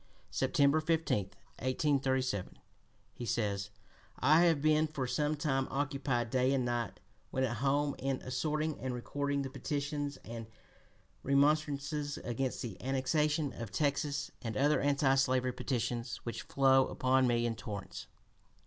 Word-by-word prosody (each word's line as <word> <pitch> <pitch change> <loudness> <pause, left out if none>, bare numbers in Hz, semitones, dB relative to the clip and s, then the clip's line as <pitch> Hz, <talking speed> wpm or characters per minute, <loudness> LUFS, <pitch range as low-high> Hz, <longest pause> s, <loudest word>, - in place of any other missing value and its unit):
September 140 +2 +3
15, 160 - +1 0.3
1837, 130 -5 0 0.6
he - - -7
says: 100 -3 -1 0.5
"I 155 +6 +5
have 165 -4 +4
been 155 +1 +3
for 145 -4 -3
some 150 +5 0
time 135 -3 0
occupied 135 -4 -1
day 130 +1 +3
and 130 -2 0
night, 120 -3 -2 0.3
when 130 - -1
at 120 -3 -1
home, 140 +3 +1
in 135 0 -1
assorting 155 +4 -1
and 130 -1 -3
recording 140 +3 -2
the 135 - -5
petitions 145 0 -3
and 115 0 -7 0.7
remonstrances 145 +1 +1
against 125 +2 -3
the 110 -6 -6
annexation 145 +2 +1
of 115 -3 -6
Texas, 145 - -1
and 110 -4 -4
other 145 +2 +4
(p. - - -1
256) 140 0 +1
anti 135 -1 +5
slavery 130 -1 +1
petitions, 120 -2 -2
which 120 - -4
flow 135 -1 +4
upon 130 0 +2
me 120 -1 +2
in 120 - 0
torrents." 105 -4 -7
135 Hz, 140 wpm, -33 LUFS, 125-145 Hz, 0.7 s, I